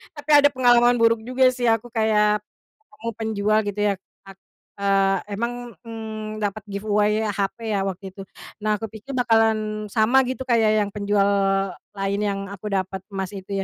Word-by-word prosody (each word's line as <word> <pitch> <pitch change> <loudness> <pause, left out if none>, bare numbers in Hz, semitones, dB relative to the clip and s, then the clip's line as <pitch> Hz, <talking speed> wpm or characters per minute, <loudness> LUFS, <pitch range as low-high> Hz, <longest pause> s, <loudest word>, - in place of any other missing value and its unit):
Tapi 290 +1 -11
ada 285 0 +6
pengalaman 245 -1 +5
buruk 230 0 +4
juga 255 +1 +4
sih 250 -1 -3
aku 225 +1 +1
kayak 215 -2 +2 0.5
ketemu 230 -5 -6
penjual 215 -1 +1
gitu 205 0 -4
ya - - +2 0.3
a - - -9 0.5
eee, 195 0 +1
emang, 235 +3 -2 0.3
mmm, 220 -1 -6
dapat 205 +1 -2
giveaway 210 +1 +1
HP 200 -1 -2 0.2
ya 195 - 0
waktu 195 0 -4
itu, 195 - -8 0.4
nah 215 -1 +1
kupikir 225 +3 -8
bakalan 220 -3 +1
sama 240 +5 +4
gitu 260 0 -4
kayak 225 -3 +3
yang 200 - -6
penjual 200 -1 +1 0.7
lain 195 +1 -1
yang 200 -1 -1
aku 200 +2 -8
dapat 190 0 -2
emas 195 -1 -3
itu 195 0 -4
215 Hz, 160 wpm, -23 LUFS, 200-230 Hz, 0.7 s, ada